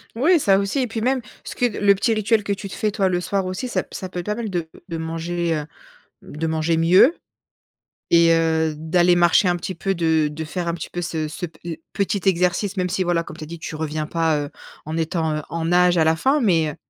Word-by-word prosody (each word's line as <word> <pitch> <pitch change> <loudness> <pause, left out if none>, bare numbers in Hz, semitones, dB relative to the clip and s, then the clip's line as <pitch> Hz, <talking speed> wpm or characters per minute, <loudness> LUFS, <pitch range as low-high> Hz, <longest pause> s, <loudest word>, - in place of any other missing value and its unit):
Oui, 320 +9 +4
ça 195 -8 +4
aussi 200 +7 -1
et 255 - 0
puis 225 0 -4
même 260 +2 +1 0.2
ce - - -8
que 245 - +1
le 205 -3 +3
petit 225 +4 +1
rituel 215 0 +1
que 200 - -1
tu 195 0 -7
te - - -8
fais 215 -2 0
toi 195 -1 +1
le 175 -1 0
soir 190 +2 -1
aussi, 185 +7 -4
ça 250 - -1
p - - -28
ça 185 - -6
peut 180 - -5
être 175 - -6
pas 210 - -1
mal, 230 -1 -4
de 175 -4 -3 0.2
de 165 -2 -4
manger, 165 +1 -2
heu, 150 -1 -3 0.6
de 160 +2 -5
manger 160 +1 0
mieux 180 - +5 0.9
et 170 0 +5
heu, 160 -1 +1
d'aller 175 +3 +2
marcher 175 +2 +4
un 175 - +2
petit 175 +2 -5
peu, 195 +3 -1
de 160 -2 +2
de 155 +2 -6
faire 170 +2 -4
un 170 - 0
petit 165 - -6
peu 175 - -4
ce 160 -2 -3
ce 165 +4 -5
pe 160 -1 -14
heu, 165 - -4 0.2
petit 200 0 -1
exercice. 180 +2 +1
Même 180 -1 0
si 185 +1 0
voilà 175 -1 +1
comme 155 - -10
tu 160 - -7
as - - -8
dit, 170 +1 -8
tu 160 - -6
reviens 155 0 -3
pas, 165 -2 +1
heu, 145 - -5 0.4
en 155 +2 -4
étant, 160 -1 -1
heu, - - -3
en 165 0 -2
âge 180 0 +4
à 160 - +4
la 160 0 +3
fin. 270 - +2
Mais 165 -8 +2
heu, - - -12
175 Hz, 260 wpm, -22 LUFS, 160-195 Hz, 0.9 s, mieux